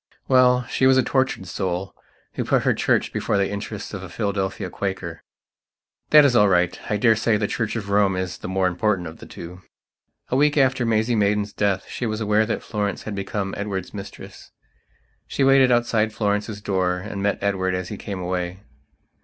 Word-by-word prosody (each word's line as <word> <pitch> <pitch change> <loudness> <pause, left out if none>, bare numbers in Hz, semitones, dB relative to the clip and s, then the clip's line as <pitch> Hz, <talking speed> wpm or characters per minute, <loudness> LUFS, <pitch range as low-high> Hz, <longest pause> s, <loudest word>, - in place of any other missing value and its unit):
Well, 125 -1 +4
she 130 +1 +1
was 130 0 +5
a 130 - +4
tortured 130 -8 0
soul 95 0 -3 0.4
who - - -2
put - - +1
her - - +3
Church - - +1
before - - 0
the 100 -1 +2
interests 100 +1 -6
of 100 - -5
a 95 - -8
Philadelphia 95 0 -2
Quaker. 90 -4 -4 0.9
That 150 -1 +8
is 130 -3 +3
all 105 -3 +6
rightI 90 +3 0
daresay 110 -1 +3
the 105 - 0
Church 115 0 -2
of 100 -3 -4
Rome 100 -2 +3
is 95 -1 -4
the - - -6
more 95 0 0
important 90 0 0
of 80 - -10
the - - -11
two. 90 +2 -10 0.7
A - - 0
week 145 +2 +3
after 130 -3 +3
Maisie 110 +1 +1
Maidan's 105 -1 +1
death 100 -2 0
she 120 - -4
was 110 0 -2
aware 105 0 +2
that 110 - -2
Florence 105 -3 -3
had 110 - -5
become 100 0 -3
Edward's 100 -3 -4
mistress. 100 -1 -10 0.8
She 140 - -1
waited 135 -1 +5
outside 115 -3 +2
Florence's 105 0 -1
door 95 -3 0
and 100 +2 -6
met 100 0 +1
Edward 95 -2 0
as 90 -1 -4
he - - -5
came 100 -2 -6
away. 90 +1 -3
100 Hz, 185 wpm, -23 LUFS, 95-115 Hz, 0.9 s, That